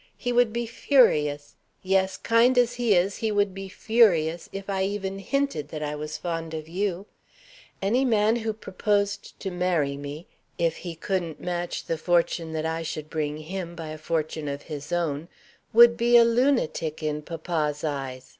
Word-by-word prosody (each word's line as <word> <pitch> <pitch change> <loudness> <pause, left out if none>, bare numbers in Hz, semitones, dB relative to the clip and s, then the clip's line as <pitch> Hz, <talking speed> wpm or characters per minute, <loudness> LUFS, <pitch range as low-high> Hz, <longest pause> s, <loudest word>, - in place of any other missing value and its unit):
He 245 - -2
would 240 -2 +4
be 235 +1 -2
furious 150 - +2 0.3
yes, 190 0 +1
kind 235 +3 +3
as 245 -1 +4
he 240 -4 +2
is, 185 +3 +1
he 220 -1 -1
would 205 -2 +1
be 195 0 -7
furious 175 -8 +2
if 195 0 -7
I 195 -1 -1
even 195 0 -3
hinted 275 - -1
that 155 -1 -5
I 150 0 -2
was 150 +1 -5
fond 165 -2 -4
of 155 -1 -6
you. 190 +2 -2 0.8
Any 235 +7 +2
man 220 -2 +3
who 225 -1 -2
proposed 205 -1 -2
to 195 - -4
marry 175 -6 0
me 145 +4 -7 0.3
if 165 -2 0
he 175 -2 -7
couldn't 170 -2 -3
match 175 -1 -3
the 165 - -2
fortune 170 -1 +1
that 160 0 -2
I 160 0 -1
should 155 -1 -5
bring 150 -1 -2
him 170 +2 -6
by 165 -2 -7
a 155 - -6
fortune 155 -1 -2
of 140 0 -4
his 150 0 -7
own 165 -3 -1 0.4
would 235 +1 +7
be 240 0 +5
a 235 - +7
lunatic 230 - +1
in 150 0 -1
papa's 155 -2 -3
eyes. 135 -4 -4
175 Hz, 175 wpm, -26 LUFS, 155-210 Hz, 0.8 s, would